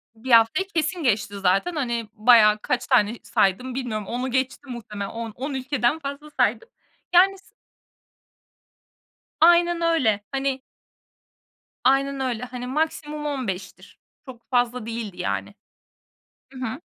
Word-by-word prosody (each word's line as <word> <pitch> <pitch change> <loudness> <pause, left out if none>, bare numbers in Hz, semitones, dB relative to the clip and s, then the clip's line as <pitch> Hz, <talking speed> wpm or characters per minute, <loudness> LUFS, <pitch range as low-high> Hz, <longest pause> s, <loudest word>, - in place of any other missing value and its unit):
1 240 +4 -6
haftayı 230 +11 +5
kesin 325 +2 0
geçti 205 -5 0
zaten. 195 - +1
Hani, 235 -6 -2
bayağı 215 -2 +6
kaç - - -2
tane 210 +2 +3
saydım 245 +7 0
bilmiyorum, 220 -6 -3
10'u 250 +2 -3
geçti 260 +2 -2
muhtemelen. 210 -5 -6
On 230 -1 -6
on 275 +3 -4
ülkeden 265 +1 0
fazla 280 +1 -7
saydım. 455 - +1 0.4
Yani, 385 +2 +5
s 385 - -20 2.0
Aynen 345 +1 +5
öyle, 280 -12 +2
hani 270 -1 -1 1.2
Aynen 275 +1 +2
öyle. 250 -3 -2
Hani, 250 0 -7
maksimum 300 +1 -2
15'tir 220 -10 -5 0.3
Çok 240 -4 -13
fazla 245 -1 +1
değildi, 225 -5 -5
yani. 180 - -3 1.0
I - - -15
hı. 255 +3 -5
255 Hz, 125 wpm, -24 LUFS, 225-285 Hz, 2.0 s, bayağı